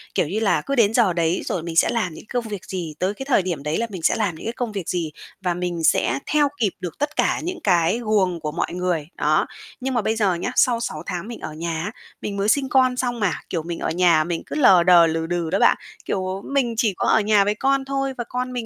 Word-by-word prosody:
Kiểu 160 - +2
như 200 +7 -2
là, 220 -3 +2
cứ 275 - -2
đến 225 -4 +4
giờ 225 -6 +3
đấy 170 0 0
rồi 170 - -2
mình 170 -1 -5
sẽ - - +4
làm 210 -8 -1
những - - -11
công 245 -2 -1
việc 205 -3 -6
gì, 175 -5 -5
tới 190 +2 0
cái 270 +6 -7
thời 270 -7 +3
điểm 175 -6 -4
đấy 150 +2 -1
là 230 - -1
mình 190 -5 -7
sẽ - - +3
làm 205 -7 -1
những - - -10
cái 230 - -2
công 240 -2 -3
việc 195 -5 -5
gì 170 -4 -2 0.3
và 180 -2 0
mình 175 -1 -3
sẽ 135 - +2
theo 295 -1 +4
kịp 210 -5 +2
được 175 -3 -6
tất 295 +2 -2
cả - - +1
những 360 +2 -4
cái 175 +2 +3
guồng 195 -5 +1
của 155 -1 -4
mọi 165 - -2
người, 175 -4 -1
đó. - - +2 0.3
Nhưng 265 0 -2
mà 240 - +1
bây 220 +2 0
giờ 205 -4 +2
nhá, 175 +8 -3
sau 240 -2 +4
6 235 - -4
tháng 180 +3 -4
mình 235 -1 -7
ở 155 - -6
nhà 165 0 -3
á, 210 - -4 0.3
mình 200 -1 -4
mới 200 +1 +1
sinh 270 +2 +2
con 255 -1 +3
xong 245 -2 -1
mà, 200 -5 +1 0.2
kiểu, 165 -3 -2
mình 170 0 -5
ở - - -2
nhà 170 -2 +4
mình 170 +1 -3
cứ - - -6
lờ 195 - +6
đờ, 175 -2 +7
lừ 160 0 -1
đừ 170 -1 -2
đó 195 - 0
bạn. - - +5 0.3
Kiểu, 185 0 -2
mình 270 -4 0
chỉ 220 -3 +2
có - - 0
ở - - +5
nhà 210 -1 +4
với 205 +1 0
con 270 +3 +1
thôi 275 0 -2
và 240 - -2
con 250 0 -3
mình 245 -2 -3
195 Hz, 275 wpm, -22 LUFS, 170-240 Hz, 0.3 s, đờ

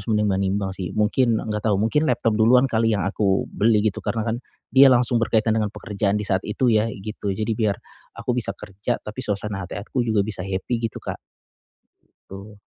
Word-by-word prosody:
harus 100 - -9
menimbang-nimbang 100 -2 0
sih. 95 -2 -5
Mungkin, 115 +2 +2
enggak 105 0 -2
tahu, 100 - +3
mungkin 115 +10 +1
laptop 120 -2 +1
duluan 115 +4 +5
kali 115 -4 +1
yang 95 - -1
aku 100 0 +1
beli 110 -1 +2
gitu 105 - 0
karena 115 -2 -2
kan 115 0 -1 0.4
dia 135 +1 +8
langsung 120 -2 +3
berkaitan 110 -1 +2
dengan 110 -1 +1
pekerjaan 105 -1 -2
di 105 - -2
saat 95 -2 +1
itu 120 +2 +1
ya 110 +1 +3
gitu. 105 -1 -6
Jadi 110 +3 -1
biar 105 -3 0 0.4
aku 125 - -2
bisa 110 -5 0
kerja, 100 -1 -4
tapi 105 +5 -6
suasana 100 -4 -3
hati - - -6
aku 105 +5 -3
juga 110 -4 +1
bisa 100 -3 -4
happy 95 +5 -2
gitu, - - -13
Kak, - - -6 1.0
gitu. 100 +2 -11
105 Hz, 195 wpm, -23 LUFS, 100-115 Hz, 1.0 s, dia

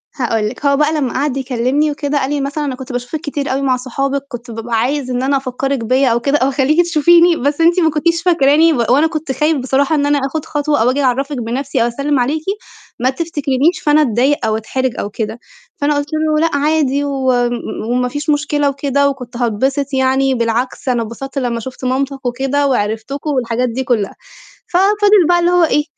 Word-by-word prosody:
هاقول 225 -5 -1
لِك، 260 +5 -9
هو 280 0 +3
بقى 300 +1 +2
لمّا 275 -5 -1
قَعَد 275 0 -1
يكلِّمني 265 +3 0
وكده، 290 0 -1
قال 265 - -1
لي 290 -1 -1
مثلًا 290 +2 -3
"أنا 265 - -3
كنت 260 0 -9
باشوفِك 245 +5 -4
كتير 290 -2 -3
أوي 270 +1 -1
مع 260 -2 +1
صحابِك، 275 +2 -3
كنت 240 -3 -8
بابقى 225 +1 -4
عايزة 260 +1 -1
إن 250 +1 -1
أنا 275 +1 +2
أفكّرِك 270 +1 -2
بيّا 255 +3 +2
أو 230 - +2
كده، 280 +4 +1
أو 265 - +1
أخلّيكِ 280 +5 +2
تشوفيني، 340 +1 +4
بس 285 +4 -1
أنتِ 340 +2 +4
ما 325 -2 +3
كنتيش 335 +2 0
فاكراني، 325 -1 +4
و - - -1
وأنا 285 +6 +4
كنت 310 -4 -4
خايف 300 +4 +1
بصراحة 270 +4 +1
إن 285 -1 +1
أنا 290 0 +2
آخُد 310 +2 -4
خطوة 295 -4 0
أو 240 - +3
آجي 280 +2 -1
أعرّفِك 270 +2 0
بنفسي، 245 +3 -2
أو 235 - +1
أسلِّم 280 +3 -1
عليكِ، 295 +6 -1 0.6
ما 255 +2 +2
تفتكرينش، 290 0 0
فأنا 300 +1 +4
أتضايق 265 +1 +1
أو 220 0 +1
أتحرج 255 +3 -3
أو 205 - -3
كده." 220 +2 -4 0.4
فأنا 290 +1 +2
قُلت 290 0 -2
له: 310 0 +1
"لأ 305 - -1
عادي 285 -1 +1
وم 260 -3 +1
م 235 -2 -5
وما 250 0 +1
فيش 290 +3 -4
مشكلة 290 -1 +1
وكده، 280 0 +1
وكنت 250 -3 -7
هاتبسط 265 +4 -1
يعني. 265 0 +2
بالعكس 235 +3 -2
أنا 245 -2 +1
اتبسطت 250 +5 -7
لمّا 240 -3 -1
شُفت 260 +2 -8
مامتك 270 +1 -2
وكده 270 +3 0
وعرفتكم." 245 +4 -2
والحاجات 250 -3 0
دي 255 +3 -3
كُلّها. 225 -6 -1 0.5
ففضل 405 0 +3
بقى 350 0 +4
اللي 345 0 +2
هو 355 -1 +4
إيه، 295 -2 +2
275 Hz, 205 wpm, -16 LUFS, 250-295 Hz, 0.6 s, تشوفيني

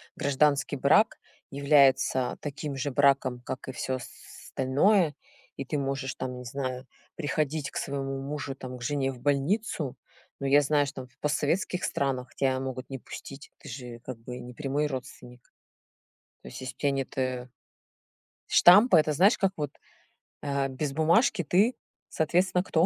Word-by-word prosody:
гражданский 140 +1 +2
брак 150 - +4 0.3
является 135 -2 +3
таким 145 0 -5
же 140 +1 -2
браком, 135 -2 +3
как 130 +2 -6
и - - -2
всё 130 +1 -3 0.6
остальное, 150 +5 +3 0.4
и 135 - -4
ты 145 +3 -2
можешь, 135 -1 -2
там, 125 -1 -5
не 125 - -9
знаю, 130 0 -4 0.3
приходить 150 -1 -2
к - - -6
своему 135 -1 -3
мужу, 140 0 -4
там, 130 -1 -8
к 120 - -10
жене 135 0 0
в 130 - -11
больницу. 145 - 0 0.4
Но 140 - -1
я 145 +2 +6
знаю, 145 0 +2
что 135 - -7
там 130 - -11
в - - -32
постсоветских 155 +5 0
странах 130 -3 -2
тебя 130 -1 +1
могут 130 -1 -5
не 135 - -5
пустить, 135 +3 -10
ты - - -14
же, 125 -2 -8
как 125 0 -8
бы, 125 +2 -8
не 125 0 -9
прямой 145 +2 -1
родственник. 125 -2 -9 0.9
То - - -13
есть, - - -9
если 130 - -6
у - - -51
тебя 145 - +1
нет, 135 -1 -4
э, 130 -1 -2 1.0
штампа, 200 +3 +7
это 155 -1 +3
знаешь, 195 - +5
как 195 -2 +2
вот, 145 -2 -3 0.7
э, 140 -1 0
без 135 +2 -3
бумажки 175 - +3
ты, 195 - +3 0.3
соответственно, 180 +3 +1
кто? 165 -2 +2
140 Hz, 165 wpm, -28 LUFS, 130-150 Hz, 1.0 s, штампа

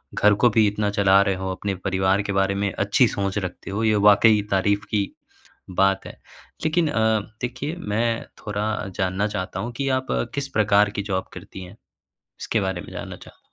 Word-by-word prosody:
घर 105 0 +5
को 120 - +7
भी 110 -1 +6
इतना 105 0 -1
चला 100 0 +6
रहे 100 -1 +1
हो 95 0 -4
अपने 100 +1 -3
परिवार 95 +1 +2
के 100 0 -3
बारे 95 0 +1
में 100 -1 -1
अच्छी - - +3
सोच 100 0 -2
रखते 90 0 -5
हो 105 +3 -2
ये 110 -1 +3
वाक़ई 105 +1 +5
तारीफ 100 +1 +1
की 100 -2 0 0.7
बात 95 +1 +2
है। - - -10 0.5
लेकिन 160 +1 +2
अ, 110 -4 +2 0.2
देखिए 130 +6 -4
मैं 115 -4 -1 0.2
थोड़ा 105 0 -2 0.3
जानना 95 +2 0
चाहता 95 -2 -4
हूँ 120 +4 -4
कि 135 -1 -1
आप 130 - -12 0.3
किस 140 -1 -2
प्रकार 105 0 +4
की - - +1
जॉब 95 0 -1
करती 95 +1 -9
हैं? 95 +5 -12 0.6
इसके 110 - -1
बारे 95 -2 -2
में - - -11
जानना - - -7
चाह - - -16
100 Hz, 190 wpm, -23 LUFS, 95-110 Hz, 0.7 s, को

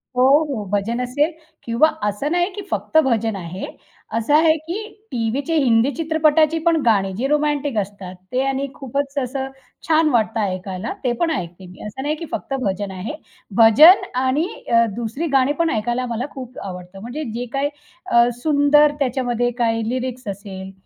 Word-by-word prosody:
हो, 250 - +3 0.3
हो. 235 -7 -3
भजन 215 +4 0
असेल 285 +6 0 0.3
किंवा 235 +6 +3 0.2
असं 210 +9 -2
नाही, 350 +1 +2
की 410 - -5
फक्त - - 0
भजन 225 -4 0
आहे. 185 0 -6 0.5
असं 230 +5 0
आहे, 315 0 +5
की 325 +5 -5 0.3
टीव्हीचे 250 +7 -1
हिंदी 245 -2 +3
चित्रपटाची 315 0 +2
पण 335 -1 +4
गाणी, 200 -4 +3
जी 240 +8 -2
रोमँटिक 295 -3 0
असतात 195 -2 -4 0.2
ते 255 +1 +1
आणि 270 +1 -1
खूपच 275 +1 -4
असं 265 +1 -3 0.4
छान 315 -1 +4
वाटतं 225 -4 +1
ऐकायला, 190 +2 -3
ते 250 - +1
पण 335 -1 +1
ऐकते 175 - -5
मी. 180 - -14
असं 210 +5 -7
नाही, 300 +2 0
की 330 - -7
फक्त - - -4
भजन 195 -2 -2
आहे. 190 +10 -5 0.4
भजन 240 - +8 0.2
आणि 280 +6 +1 0.2
अ, 230 0 +5
2री 240 +8 -3
गाणी 270 +2 +3
पण 335 -1 +2
ऐकायला 240 +2 -1
मला 235 +2 -2
खूप 255 -2 -8
आवडतं. 180 0 -8
म्हणजे 245 +8 -5
जे 240 +2 -3
काही 280 +1 0 0.4
अ, 235 -9 +4
सुंदर 295 0 +4
त्याच्यामध्ये 245 -3 0
काही 225 -2 0
लिरिक्स 255 -1 -4
असेल 190 -1 -7
250 Hz, 165 wpm, -21 LUFS, 220-295 Hz, 0.5 s, भजन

